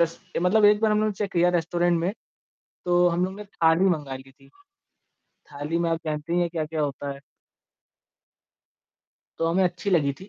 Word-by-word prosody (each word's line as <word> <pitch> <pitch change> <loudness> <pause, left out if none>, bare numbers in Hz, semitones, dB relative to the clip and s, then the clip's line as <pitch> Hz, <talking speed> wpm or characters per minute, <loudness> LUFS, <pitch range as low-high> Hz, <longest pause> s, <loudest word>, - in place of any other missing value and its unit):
रस 165 0 +1 0.2
ए - - +2
मतलब 210 +3 +4
एक 210 +1 +5
बार 220 -1 +2
हम 210 - +2
लोग 215 0 +1
ने - - -2
चेक 205 -2 -3
किया 175 0 +3
रेस्टोरेंट 175 +1 +1
में, 180 +4 -1 0.7
तो 175 0 +4
हम 175 +1 0
लोग 190 - -4
ने 210 - -8
थाली 165 -2 +2
मँगा 150 -8 0
ली 130 0 -14
थी। 135 0 -22 0.8
थाली 145 +3 -6
में 170 -1 0
आप 165 0 -1
जानती 155 +2 -3
ही 175 - +2
हैं, 175 -1 +1
क्या-क्या 160 -2 -3
होता 145 0 -3
है। 140 - -12 2.2
तो, 165 - 0
हमें 180 +3 +2
अच्छी 180 +3 -2
लगी 150 -6 +2
थी। 195 - -11
170 Hz, 200 wpm, -25 LUFS, 155-185 Hz, 2.2 s, एक